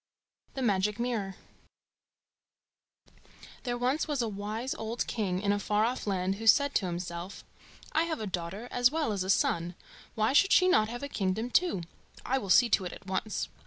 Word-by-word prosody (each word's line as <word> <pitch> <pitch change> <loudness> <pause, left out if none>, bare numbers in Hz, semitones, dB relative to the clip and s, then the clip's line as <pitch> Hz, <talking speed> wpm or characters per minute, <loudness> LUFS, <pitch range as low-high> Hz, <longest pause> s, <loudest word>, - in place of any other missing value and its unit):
] - - -40
The 265 - -2
Magic 210 0 +1
Mirror 225 -6 -2 2.3
There 240 -1 -1
was 255 +6 0
once 290 -4 -1
a - - -1
wise 215 +5 -4
old 225 +2 -3
king 190 -5 -2
in 200 +1 +1
a 205 - +1
far 210 +1 +1
off 245 -1 -3
land 190 0 0
who 225 +1 -5
said 285 +4 +5
to 190 - +1
himself, 175 +2 -5 0.5
"I 320 +2 +2
have 325 -2 -3
a 215 - -3
daughter 185 +4 -4
as 245 0 +4
well 305 -5 -1
as 195 -2 -1
a 190 - -6
son; 170 -2 +1 0.4
why 220 +3 +1
should 390 +7 +5
she 365 - +6
not 215 -11 +4
have 245 +3 -6
a - - -2
kingdom 220 0 -2
too? 345 - +2 0.4
I 265 +1 +1
will 200 -6 -7
see 240 +6 +6
to 195 -3 +2
it 180 - -5
at - - -12
once." 190 +3 -2
215 Hz, 195 wpm, -30 LUFS, 190-245 Hz, 2.3 s, she